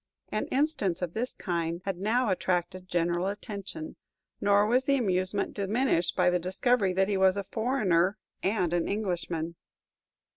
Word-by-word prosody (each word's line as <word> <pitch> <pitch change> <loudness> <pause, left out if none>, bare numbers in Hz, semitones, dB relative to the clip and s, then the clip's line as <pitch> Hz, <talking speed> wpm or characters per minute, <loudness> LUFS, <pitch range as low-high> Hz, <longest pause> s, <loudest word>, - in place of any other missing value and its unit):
An - - -2
instance 260 - 0
of 175 -1 -3
this 245 +3 -2
kind 170 -2 -2
had 195 -2 -2
now 225 +4 +1
attracted 185 0 -1
general 175 +1 +1
attention, 210 - -6 0.4
nor 205 0 +4
was 250 +4 +2
the 275 0 +3
amusement 190 -3 0
diminished 200 -3 +1
by 180 -1 +4
the 180 - +2
discovery 190 +3 +1
that 190 +1 +2
he 205 -1 0
was 190 0 +4
a 200 - -1
foreigner 205 -5 +1 0.2
and 185 -4 +1
an 175 -1 +1
Englishman. 175 -5 -2
190 Hz, 150 wpm, -29 LUFS, 180-220 Hz, 0.4 s, nor